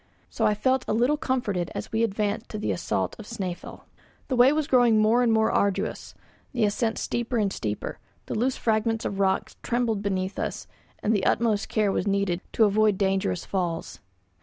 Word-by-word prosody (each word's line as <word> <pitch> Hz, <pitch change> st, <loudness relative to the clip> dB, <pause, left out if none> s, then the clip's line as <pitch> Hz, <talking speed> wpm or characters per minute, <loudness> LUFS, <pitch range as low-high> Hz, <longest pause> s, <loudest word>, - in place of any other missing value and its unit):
So -, -, +1 dB
I 210 Hz, -, +2 dB
felt 260 Hz, +4 st, +1 dB
a -, -, +1 dB
little 245 Hz, +6 st, +3 dB
comforted 230 Hz, -, -1 dB
as -, -, -5 dB
we 225 Hz, -, 0 dB
advanced 210 Hz, 0 st, -1 dB
to 215 Hz, -, -5 dB
the 210 Hz, -, -1 dB
assault 95 Hz, -, -2 dB
of 215 Hz, -, -9 dB
Snæfell. 190 Hz, -6 st, -6 dB, 0.5 s
The 260 Hz, -, +1 dB
way 250 Hz, +2 st, +6 dB
was 305 Hz, 0 st, +1 dB
growing 245 Hz, -6 st, +4 dB
more 220 Hz, +3 st, +4 dB
and 240 Hz, -2 st, +3 dB
more 220 Hz, 0 st, +3 dB
arduous, 200 Hz, -1 st, -1 dB, 0.4 s
the 235 Hz, -4 st, +2 dB
ascent 225 Hz, +2 st, 0 dB
steeper 240 Hz, 0 st, -2 dB
and 200 Hz, -3 st, +1 dB
steeper; 105 Hz, -2 st, -4 dB, 0.3 s
the -, -, -5 dB
loose 245 Hz, +4 st, 0 dB
fragments 225 Hz, 0 st, 0 dB
of 195 Hz, -, -3 dB
rock 190 Hz, -1 st, +1 dB
trembled 235 Hz, -4 st, 0 dB
beneath 190 Hz, -1 st, -2 dB
us, -, -, -3 dB, 0.4 s
and 215 Hz, -, +2 dB
the 200 Hz, -3 st, +1 dB
utmost 220 Hz, -3 st, +1 dB
care 210 Hz, -2 st, +1 dB
was 205 Hz, -, -1 dB
needed 200 Hz, -3 st, 0 dB
to 225 Hz, -, +5 dB
avoid 210 Hz, -1 st, +3 dB
dangerous 190 Hz, -, 0 dB
falls. 175 Hz, -4 st, -3 dB
215 Hz, 185 wpm, -26 LUFS, 195-235 Hz, 0.5 s, way